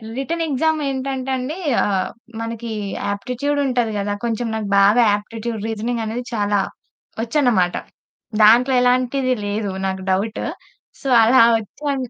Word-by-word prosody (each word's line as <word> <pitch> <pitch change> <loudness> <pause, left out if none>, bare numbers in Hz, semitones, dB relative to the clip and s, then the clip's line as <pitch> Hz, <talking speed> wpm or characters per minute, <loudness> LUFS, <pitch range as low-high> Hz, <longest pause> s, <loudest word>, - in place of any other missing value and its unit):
Written 330 +5 -2
exam 315 +2 +1
ఏంటంటే 265 0 -3
అండి 275 +7 -4 0.2
ఆహ్, 190 -2 0 0.3
మనకి 230 0 -5 0.4
ఆప్టిట్యూడ్ 255 +8 -2
ఉంటది 245 -4 0
గదా! 205 0 -1
కొంచెం 230 +1 -1
నాకు 215 -2 -3
బాగా 210 +5 +5
ఆప్టిట్యూడ్, 225 +1 -6
రీజనింగ్ 225 +1 -2
అనేది 235 +3 -3
చాలా 205 -2 +1 0.6
వచ్చన్నమాట. 230 -8 +2 0.7
దాంట్లో 245 +5 +6
ఎలాంటిది 255 +1 +2
లేదు 205 -1 -2
నాకు 190 0 -2
డౌట్. 205 +4 -1 0.6
సో 270 - -3
అలా 235 +1 +6 0.2
వచ్చాను 265 +3 -4
235 Hz, 125 wpm, -20 LUFS, 210-265 Hz, 0.7 s, దాంట్లో